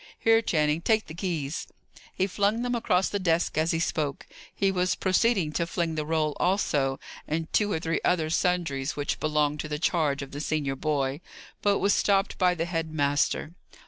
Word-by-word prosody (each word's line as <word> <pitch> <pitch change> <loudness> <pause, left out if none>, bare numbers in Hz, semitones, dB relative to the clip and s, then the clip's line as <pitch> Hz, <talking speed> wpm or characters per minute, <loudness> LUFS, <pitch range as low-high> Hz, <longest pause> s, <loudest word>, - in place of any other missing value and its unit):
Here, 225 0 +4
Channing, 155 -5 +1
take 220 +3 +2
the 155 - -9
keys." 165 -4 -3 0.4
He 190 - 0
flung 205 +4 0
them 245 0 -1
across 190 -6 +2
the 205 - -2
desk 170 -2 +1
as 155 +1 +1
he 165 - +1
spoke; 155 -4 -2 0.3
he 195 -1 +1
was 180 -1 +1
proceeding 190 -3 +2
to 170 +2 -1
fling 170 -2 -1
the 155 -1 -3
roll 155 -2 0
also, 145 -8 +1 0.3
and 160 +1 -3
two 210 -1 +2
or 160 - 0
three 165 0 -1
other 160 -3 +1
sundries 165 -6 0
which 145 -1 -2
belong 150 -1 +1
to 155 - -3
the 150 0 -3
charge 150 -4 0
of 135 - -10
the 145 - -5
senior 150 -3 -1
boy, 140 0 -1 0.4
but 200 -1 +3
was 200 0 +2
stopped 195 0 +1
by 180 -1 +3
the 165 -1 -1
head 165 -2 -3
master. 145 +1 0
165 Hz, 190 wpm, -27 LUFS, 150-185 Hz, 0.4 s, Here